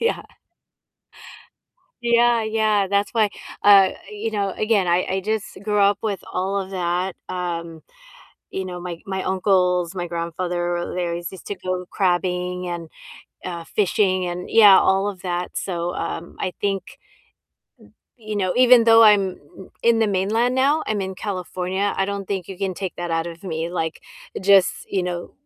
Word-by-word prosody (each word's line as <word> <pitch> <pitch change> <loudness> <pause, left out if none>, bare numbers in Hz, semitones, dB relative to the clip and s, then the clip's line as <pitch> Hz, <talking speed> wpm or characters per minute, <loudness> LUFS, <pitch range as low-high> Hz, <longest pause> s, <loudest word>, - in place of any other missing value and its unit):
yeah. 470 0 0 1.8
Yeah, 235 -1 +3
yeah, 215 -2 +1
that's 200 +1 0
why 220 -3 +3 0.3
uh, 195 -2 +7 0.2
you 210 +2 -4
know, 200 -3 -1
again, 215 -3 +1
I 175 +1 +2
I 190 +1 0
just 215 +1 -3
grew 210 -1 0
up 200 0 +4
with 205 -4 -2
all 195 +2 -1
of 190 0 -7
that, 180 0 -2
um, 170 -3 -4 0.7
you 190 -1 -4
know, 180 -1 -6
my 175 -1 -5
my 190 -1 -3
uncles, 180 -2 +1
my 175 -2 -4
grandfather, 175 +1 -3
they 180 - -1
always 170 0 -4
used 190 - -12
to 205 - -3
go 185 -1 -4
crabbing, 180 -1 -1
and, 170 -2 -5 0.6
uh, 170 -2 -5
fishing, 185 -1 +1
and, 175 +1 -5
yeah, 205 -4 +8
all 195 +1 +2
of 190 -3 -7
that, 180 -1 -3
so, 175 -2 -3
um, 170 +1 -5
I 185 - -2
think 195 -2 0 1.4
m 220 -2 -16
you 210 - -1
know, 185 -2 0
even 250 -2 +7
though 230 0 +7
I'm 200 -4 +5 0.5
in 230 -1 +4
the 225 - +3
mainland 215 +6 +1
now, 280 +4 +2
I'm 215 -2 -1
in 190 0 -4
California, 185 0 -3
I 195 - +1
don't 200 -1 -4
think 190 -3 -3
you 190 - -8
can 195 -2 -2
take 190 -1 -5
that 175 -1 -4
out 165 0 0
of 170 -1 -9
me, 165 -2 -3
like, 160 -2 -3 0.4
just 195 -1 +5 0.2
you 190 - 0
know, 175 -1 -4
190 Hz, 165 wpm, -22 LUFS, 180-205 Hz, 1.8 s, yeah